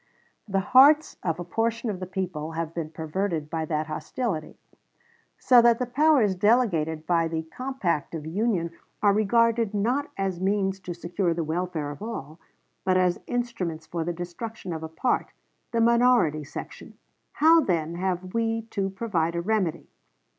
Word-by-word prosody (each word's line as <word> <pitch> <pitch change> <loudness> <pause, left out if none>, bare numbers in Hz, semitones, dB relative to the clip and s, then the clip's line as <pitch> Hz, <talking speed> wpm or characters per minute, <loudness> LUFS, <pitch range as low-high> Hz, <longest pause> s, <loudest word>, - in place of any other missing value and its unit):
The 195 -1 0
hearts 285 +9 +5
of 165 -1 -2
a - - -3
portion 230 +6 -1
of 190 - -6
the 185 - -5
people 180 -4 -4
have 165 0 -3
been 165 -2 -4
perverted 160 0 -3
by 160 -1 -1
that 155 -1 -1
hostility, 160 +2 -4 0.8
so 250 -2 +6
that 235 -1 +5
the 250 - -1
powers 255 -4 +3
delegated 180 -7 +2
by 165 -1 +2
the 160 0 -3
compact 175 - -3
of 155 -2 -6
union 180 -1 0 0.3
are 205 -1 +5
regarded 230 +1 +2
not 250 +8 0
as 190 -2 -2
means 195 0 0
to 180 -2 -6
secure 170 0 -1
the 170 - -1
welfare 160 -2 -2
of 145 - -10
all, 165 -8 -6 0.4
but 185 -1 +2
as 180 -1 +2
instruments 230 -10 -3
for 170 -1 -3
the 175 - -2
destruction 175 +3 -6
of 160 - -5
a 160 - -6
part 200 +10 -1 0.4
the 230 - 0
minority 235 -10 +4
section. 145 - -9 0.4
How, 325 +2 +6
then, 170 - -1
have 185 +1 -3
we 225 0 0
to 195 -2 -1
provide 185 -5 -1
a 170 - 0
remedy? 190 -4 -1
185 Hz, 160 wpm, -26 LUFS, 165-230 Hz, 0.8 s, so